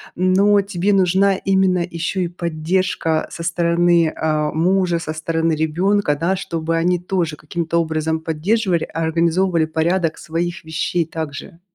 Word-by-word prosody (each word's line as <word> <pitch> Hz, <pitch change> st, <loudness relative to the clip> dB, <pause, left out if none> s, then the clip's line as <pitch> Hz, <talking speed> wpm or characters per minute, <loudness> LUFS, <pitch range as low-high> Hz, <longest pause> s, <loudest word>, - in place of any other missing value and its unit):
но 195 Hz, +3 st, +3 dB
тебе 195 Hz, 0 st, -1 dB
нужна 195 Hz, 0 st, +3 dB
именно 190 Hz, -2 st, +2 dB
ещё 170 Hz, +3 st, -3 dB
и 180 Hz, -, 0 dB
поддержка 170 Hz, -1 st, -1 dB
со 170 Hz, -, -7 dB
стороны, 170 Hz, -1 st, +2 dB
а, 155 Hz, -1 st, 0 dB
мужа, 175 Hz, +1 st, +1 dB
со 155 Hz, -2 st, -5 dB
стороны 165 Hz, +1 st, -1 dB
ребёнка, 160 Hz, +2 st, +1 dB
да, 170 Hz, +5 st, 0 dB
чтобы 165 Hz, -3 st, -3 dB
они 175 Hz, +2 st, +1 dB
тоже 175 Hz, -4 st, -2 dB
каким-то 165 Hz, +2 st, -3 dB
образом 160 Hz, -1 st, -1 dB
поддерживали, 170 Hz, +3 st, 0 dB
организовывали 165 Hz, +2 st, +1 dB
порядок 160 Hz, +1 st, 0 dB
своих 170 Hz, +1 st, -4 dB
вещей 160 Hz, +2 st, -1 dB
также. 160 Hz, +2 st, -7 dB
170 Hz, 135 wpm, -19 LUFS, 160-185 Hz, -, но